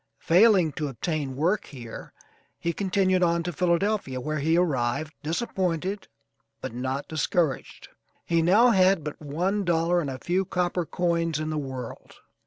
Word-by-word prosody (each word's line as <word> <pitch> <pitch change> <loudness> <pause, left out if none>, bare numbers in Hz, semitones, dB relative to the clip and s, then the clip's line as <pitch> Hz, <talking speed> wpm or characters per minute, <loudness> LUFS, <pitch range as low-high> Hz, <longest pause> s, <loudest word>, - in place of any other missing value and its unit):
Failing 185 -2 +5
to 150 +1 -3
obtain 140 0 -3
work 175 +9 +1
here 120 -5 -9 0.5
he 170 0 -2
continued 185 0 +1
on 170 -1 +2
to 175 +1 -4
Philadelphia, 175 -4 0
where 155 +4 -3
he 160 +4 +2
arrived, 155 -2 0
disappointed 185 +2 -2 0.5
but - - -6
not 130 +3 -3
discouraged. 155 -2 -1 0.4
He 170 -1 +2
now 205 +9 +5
had 190 -4 +4
but 150 +1 -6
one 180 +8 -1
dollar, 175 0 +2
and 145 - -3
a 130 - -5
few 180 +7 0
copper 180 -2 -1
coins, 170 -3 0
in 155 0 -3
the 155 - -2
world. 130 -4 -7
170 Hz, 150 wpm, -26 LUFS, 150-180 Hz, 0.5 s, Failing